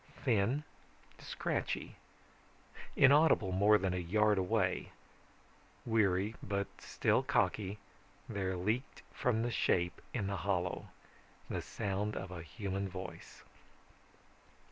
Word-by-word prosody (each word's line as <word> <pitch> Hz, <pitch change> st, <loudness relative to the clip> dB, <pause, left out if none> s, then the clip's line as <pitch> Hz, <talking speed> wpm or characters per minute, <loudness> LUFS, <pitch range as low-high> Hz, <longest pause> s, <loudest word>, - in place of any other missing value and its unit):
Thin, 120 Hz, +4 st, +2 dB, 0.6 s
scratchy, -, -, -3 dB, 1.0 s
inaudible 140 Hz, -8 st, +5 dB
more 100 Hz, +3 st, +5 dB
than 95 Hz, -2 st, -1 dB
a -, -, -1 dB
yard 105 Hz, +4 st, +3 dB
away, 90 Hz, -1 st, 0 dB, 0.9 s
weary 105 Hz, -2 st, +2 dB
but 100 Hz, 0 st, -1 dB, 0.2 s
still -, -, +2 dB
cocky, 100 Hz, -1 st, 0 dB, 0.5 s
there 95 Hz, -2 st, -2 dB
leaked 110 Hz, +9 st, -2 dB
from 115 Hz, -2 st, +1 dB
the 120 Hz, -, -1 dB
shape 90 Hz, -3 st, +1 dB
in 110 Hz, -6 st, -2 dB
the 100 Hz, 0 st, -2 dB
hollow 90 Hz, -2 st, -1 dB, 0.6 s
the -, -, -1 dB
sound 105 Hz, 0 st, -2 dB
of 95 Hz, -1 st, -5 dB
a 90 Hz, -2 st, -6 dB
human 100 Hz, +1 st, -4 dB
voice. 90 Hz, -2 st, -8 dB
100 Hz, 105 wpm, -34 LUFS, 95-110 Hz, 1.0 s, inaudible